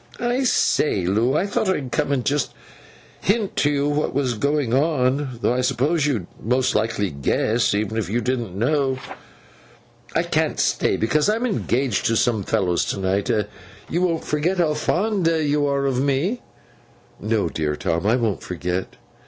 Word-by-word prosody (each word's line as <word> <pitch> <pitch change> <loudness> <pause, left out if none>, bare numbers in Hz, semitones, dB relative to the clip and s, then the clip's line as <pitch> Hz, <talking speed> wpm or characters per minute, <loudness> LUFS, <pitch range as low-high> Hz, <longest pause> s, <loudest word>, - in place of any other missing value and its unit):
'I 245 +2 0
say, 125 - +2
Loo! 110 +9 +2
I 185 - +1
thought 200 0 0
I'd 135 -9 -1
come, - - 0
and 130 -4 0
just 145 +1 0 0.6
hint 205 0 0
to 145 - +3
you 145 0 +1
what 145 -2 -1
was 135 -3 +1
going 140 +1 0
on: 135 -2 +1
though - - +3
I 125 - 0
supposed 145 +5 +1
you'd 115 -11 -1 0.2
most 125 +3 +1
likely 105 -3 0
guess, 100 - +1
even 110 +2 -1
if 105 - -3
you 115 +4 0
didn't 120 -7 -2
know. 135 +3 +1 1.2
I - - +3
can't - - 0
stay, - - +1
because 150 - +2
I'm 225 +3 +1
engaged 130 - 0
to 115 - +1
some 115 -2 +2
fellows 90 -2 +1
to - - -3
night. 95 +3 0 0.6
You 175 - +1
won't 170 -3 0
forget 160 +6 0
how 165 -4 +2
fond 185 +4 0
you 150 -3 +1
are 140 0 0
of 130 -2 +1
me?' 145 - 0 0.8
'No, 110 -2 0
dear 75 -2 -2
Tom, 85 +5 -1
I 115 - +4
won't 115 -5 -1
forget. 90 +1 -4
130 Hz, 170 wpm, -22 LUFS, 110-150 Hz, 1.2 s, I